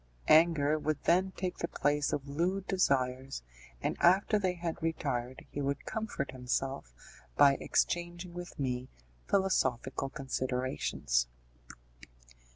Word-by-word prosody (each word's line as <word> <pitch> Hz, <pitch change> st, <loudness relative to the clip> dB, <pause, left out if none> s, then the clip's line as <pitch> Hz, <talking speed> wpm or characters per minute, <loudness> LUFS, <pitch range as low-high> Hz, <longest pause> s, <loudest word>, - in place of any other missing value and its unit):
Anger 155 Hz, -2 st, +5 dB
would 150 Hz, -1 st, -2 dB
then 185 Hz, +3 st, +3 dB
take 185 Hz, -1 st, -4 dB
the 170 Hz, -, -1 dB
place 145 Hz, -1 st, +1 dB
of 140 Hz, -1 st, -2 dB
lewd 180 Hz, +7 st, -1 dB
desires, 135 Hz, -, 0 dB, 0.4 s
and -, -, 0 dB
after 195 Hz, +4 st, +5 dB
they 185 Hz, -2 st, 0 dB
had 170 Hz, -1 st, -4 dB
retired 130 Hz, -6 st, -2 dB
he 145 Hz, -, -3 dB
would 140 Hz, 0 st, -2 dB
comfort 220 Hz, -12 st, -3 dB
himself 130 Hz, -, -2 dB, 0.5 s
by 140 Hz, -, +7 dB
exchanging 175 Hz, 0 st, -1 dB
with 175 Hz, 0 st, -8 dB
me 125 Hz, -2 st, -2 dB, 0.4 s
philosophical 135 Hz, -9 st, +1 dB
considerations. 130 Hz, -, -1 dB
145 Hz, 115 wpm, -32 LUFS, 130-175 Hz, 0.5 s, by